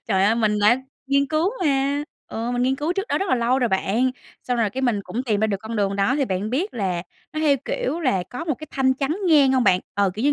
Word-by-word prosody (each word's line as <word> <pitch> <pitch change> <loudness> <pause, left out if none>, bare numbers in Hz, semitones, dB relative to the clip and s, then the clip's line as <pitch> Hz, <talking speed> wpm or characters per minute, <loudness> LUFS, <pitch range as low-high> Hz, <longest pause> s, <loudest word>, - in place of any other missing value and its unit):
Trời 195 -3 +2
ơi, 220 +3 +3
mình 215 -2 +1
đã 240 +5 +4 0.2
nghiên 280 0 +2
cứu 315 +5 +1
mà, 280 0 +1 0.3
ừ, 230 +2 -3
mình 245 0 0
nghiên 265 +1 +1
cứu 310 +5 -1
trước 390 +3 -3
đó - - +1
rất 390 -1 -2
là - - +3
lâu 245 +2 +1
rồi 245 -3 +1
bạn, 215 +6 +1 0.3
xong 250 -1 -1
rồi 220 -3 +1
cái 265 +1 -4
mình 235 -5 +1
cũng 245 - -3
tìm 215 -5 0
ra 220 - +3
được 200 -2 -1
con 220 +1 -5
đường 200 -1 0
đó 225 +8 +2
thì 280 - +1
bạn 195 0 -2
biết 330 - -1
là 185 -6 -1 0.3
nó 310 - -3
theo, 290 -3 +4
kiểu, 310 +6 -2
là 225 - +1
có 315 +7 -5
một 310 -5 0
cái 310 - -10
thanh 260 -1 +2
chắn 280 +5 -1
ngang 280 -4 +5
hông 255 -2 +2
bạn? 180 -3 +4
Ờ, 200 -1 +2
kiểu 215 - -4
như 290 - +4
250 Hz, 280 wpm, -23 LUFS, 210-280 Hz, 0.3 s, ngang